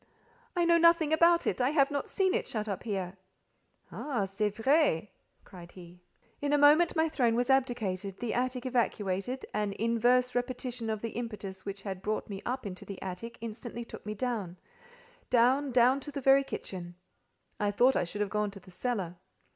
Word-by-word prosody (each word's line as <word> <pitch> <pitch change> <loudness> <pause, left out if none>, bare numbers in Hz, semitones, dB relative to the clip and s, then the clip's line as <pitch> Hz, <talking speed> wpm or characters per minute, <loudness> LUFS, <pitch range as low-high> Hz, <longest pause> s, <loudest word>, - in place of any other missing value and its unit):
"I 350 -1 +2
know 335 0 +5
nothing 335 -2 +5
about 340 +1 +5
it. - - 0
I 250 - +3
have 285 -2 +3
not 285 -1 -2
seen 380 -2 +1
it, 465 - -1
shut 215 -1 -3
up 200 -3 -3
here." 195 -4 -4 0.7
"Ah! 250 -9 -2
C'est 195 +2 -1
vrai," 245 - +2 0.3
cried 175 -2 -12
he. 175 -1 -13 0.4
In 290 0 0
a - - +5
moment 300 +5 +5
my 320 0 +3
throne 245 -7 +1
was 245 +2 +1
abdicated, 210 -8 0
the 240 -3 -2
attic 250 0 -1
evacuated; 235 -1 -1
an 210 -1 -1
inverse 240 +3 +2
repetition 245 -1 -3
of 215 -1 -2
the 230 - -3
impetus 205 -5 -6
which 200 0 -5
had 190 -2 -5
brought 215 +2 -2
me 195 0 -5
up 255 0 -3
into 185 -2 -6
the 200 - -8
attic, 195 +5 -6
instantly 230 +1 -6
took - - -10
me 210 0 -5
down—down—down 255 - 0
to 295 +2 -8
the 280 - -4
very 270 +1 +5
kitchen. 175 -9 -7 0.6
I 205 - +1
thought 245 +6 +4
I - - +2
should 205 +4 -5
have 205 - -1
gone 210 -1 0
to 200 0 -11
the 185 - -16
cellar. 190 -5 -3
235 Hz, 180 wpm, -30 LUFS, 200-270 Hz, 0.7 s, know